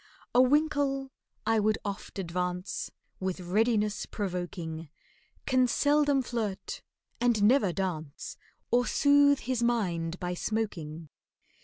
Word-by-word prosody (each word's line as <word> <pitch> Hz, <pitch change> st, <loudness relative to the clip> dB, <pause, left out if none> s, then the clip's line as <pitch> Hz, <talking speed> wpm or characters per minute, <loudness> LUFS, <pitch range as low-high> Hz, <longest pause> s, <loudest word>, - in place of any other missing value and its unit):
"A 245 Hz, -, +7 dB
winkle," 275 Hz, -1 st, +2 dB, 0.3 s
I 225 Hz, 0 st, +3 dB
would 215 Hz, +1 st, +2 dB
oft 200 Hz, 0 st, -5 dB
advance 180 Hz, 0 st, -3 dB, 0.3 s
With 190 Hz, 0 st, -2 dB
readiness 210 Hz, +3 st, +1 dB
provoking, 175 Hz, -5 st, -4 dB, 0.6 s
"Can 255 Hz, -1 st, +3 dB
seldom 285 Hz, +1 st, +3 dB
flirt, 220 Hz, -6 st, -3 dB, 0.4 s
and 235 Hz, -3 st, +2 dB
never 210 Hz, -3 st, +5 dB
dance, 165 Hz, -6 st, -4 dB, 0.4 s
Or 245 Hz, +1 st, +3 dB
soothe 285 Hz, -1 st, +5 dB
his 250 Hz, -1 st, -1 dB
mind 180 Hz, -8 st, 0 dB
by 180 Hz, 0 st, -2 dB
smoking." 170 Hz, -7 st, -3 dB
210 Hz, 110 wpm, -29 LUFS, 180-255 Hz, 0.6 s, A